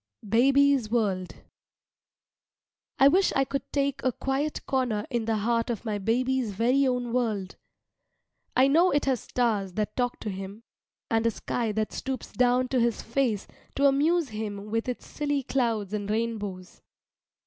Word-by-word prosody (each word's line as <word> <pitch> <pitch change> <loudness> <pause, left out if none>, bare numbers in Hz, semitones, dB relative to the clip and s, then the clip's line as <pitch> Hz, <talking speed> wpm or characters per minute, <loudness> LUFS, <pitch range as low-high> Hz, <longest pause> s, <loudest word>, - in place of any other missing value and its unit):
BABY'S 270 +2 +4
WORLD 200 -6 -1 1.6
I 270 - +7
wish 370 +7 +4
I 270 - +4
could 275 0 -2
take 280 -1 0
a 255 - +2
quiet 270 +5 -2
corner 245 -6 0
in 235 -3 -1
the 225 0 +1
heart 230 +3 0
of 235 -1 -3
my 210 -2 -2
baby's 245 +2 0
very 250 +7 +2
own 245 -2 -1
world. 215 -7 -1 1.0
I 260 +1 +5
know 330 +6 +5
it 290 - +1
has 265 -3 +1
stars 210 -6 -1
that 210 +1 -2
talk 245 -1 -1
to 210 - -3
him, 195 +3 -7 0.5
and 225 0 +2
a - - +5
sky 230 +1 -2
that 215 0 -2
stoops 265 -1 -5
down 250 0 +2
to 260 - +1
his 235 -1 0
face 235 -4 0 0.3
to 280 - +2
amuse 295 +3 +3
him 210 -1 -5
with 225 +2 -1
its 250 - -5
silly 290 -2 -2
clouds 230 -7 -1
and 205 -1 -3
rainbows. 210 -5 -3
235 Hz, 160 wpm, -27 LUFS, 215-270 Hz, 1.6 s, I